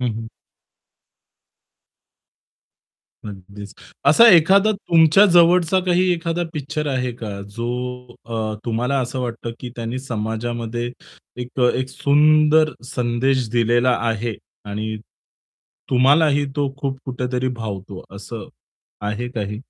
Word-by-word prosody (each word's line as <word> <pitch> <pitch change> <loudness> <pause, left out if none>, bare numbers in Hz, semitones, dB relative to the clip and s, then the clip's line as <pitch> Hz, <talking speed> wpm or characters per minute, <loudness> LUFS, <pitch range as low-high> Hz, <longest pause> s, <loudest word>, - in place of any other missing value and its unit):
हं, 125 -2 -1
हं. 115 0 -7 3.0
अगदीच. 100 +1 -11 0.3
असा 195 +12 +7
एखादा 195 +6 +5
तुमच्या 170 -2 +4
जवळचा 175 +1 +5
काही 180 +1 +2
एखादा 170 0 -2
पिक्चर 150 +1 -4
आहे 125 -2 -2
का 105 -4 -6 0.2
जो 115 0 -3 0.6
अ, 110 -2 -3
तुम्हाला 125 +4 -1
असं 130 +1 -3
वाटतं 115 -1 -5
की 125 - -7
त्यांनी 115 +1 -4
समाजामध्ये 120 0 -4 0.5
1 125 +1 0
सुंदर 155 +2 +3
संदेश 125 +1 -1
दिलेला 120 +1 +2
आहे 115 0 -2 0.3
आणि 110 +2 -4 0.9
तुम्हालाही 145 +3 +4
तो 140 -2 -1
खूप 135 -2 -3
कुठेतरी 125 0 -2
भावतो 100 -4 -7
असं 105 +1 -8 0.5
आहे 105 +4 -3
काही? 105 -3 -4
125 Hz, 105 wpm, -20 LUFS, 115-150 Hz, 3.0 s, असा